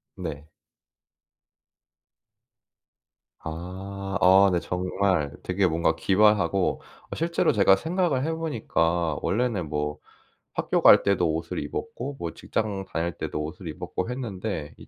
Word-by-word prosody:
네. 75 +1 -6 2.9
아. 95 +4 -5
어 95 +2 +7
네. 90 - +2
정말 90 -4 0
되게 95 +1 +1
뭔가 80 -1 +1
기발하고 100 +1 +2 0.3
어 - - -3
실제로 170 +1 +1
제가 100 -2 +5
생각을 165 - 0
해 160 - 0
보니까 85 - 0
원래는 105 -7 0
뭐 75 0 -2 0.6
학교 - - 0
갈 - - +8
때도 90 -5 +2
옷을 80 +2 -4
입었고 140 - -5
뭐 85 -2 -4
직장 100 -3 -3
다닐 85 -2 -2
때도 75 - -3
옷을 85 +4 -7
입었고 80 +7 -4
했는데 100 - -4
이 - - -14
95 Hz, 230 characters per minute, -26 LUFS, 80-105 Hz, 2.9 s, 갈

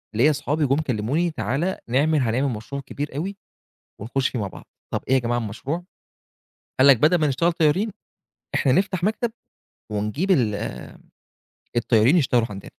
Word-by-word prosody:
ليّا 140 +7 +5
صحابي 150 +1 0
جُم 135 - +2
كلموني 145 +5 0
تعالَ 150 - -1
نعمل 145 +5 +2
هنعمل 130 +3 +1
مشروع 140 +6 -6
كبير 145 0 -6
أوي 195 +6 -3 0.6
ونخش 130 +4 0
فيه 125 - -4
مع 100 - -2
بعض، - - -12 0.3
طَب - - 0
إيه 130 - +2
يا - - +4
جماعة 120 0 -1
المشروع. 130 - -4 1.0
قال 135 - +7
لك 135 -4 +8
بدل 155 +8 +4
ما 155 - +2
نشتغل 165 +6 +2
طيارين، 170 +7 +1 0.6
إحنا 130 - +3
نفتح 185 +1 +1
مكتب 220 +2 0 0.6
ونجيب 105 - -1
ال 115 - +3
آآ 100 - -7 0.8
الطيارين 120 +6 +4
يشتغلوا 125 -7 +2
عندنا. 100 -1 -8
140 Hz, 160 wpm, -23 LUFS, 120-165 Hz, 1.0 s, لك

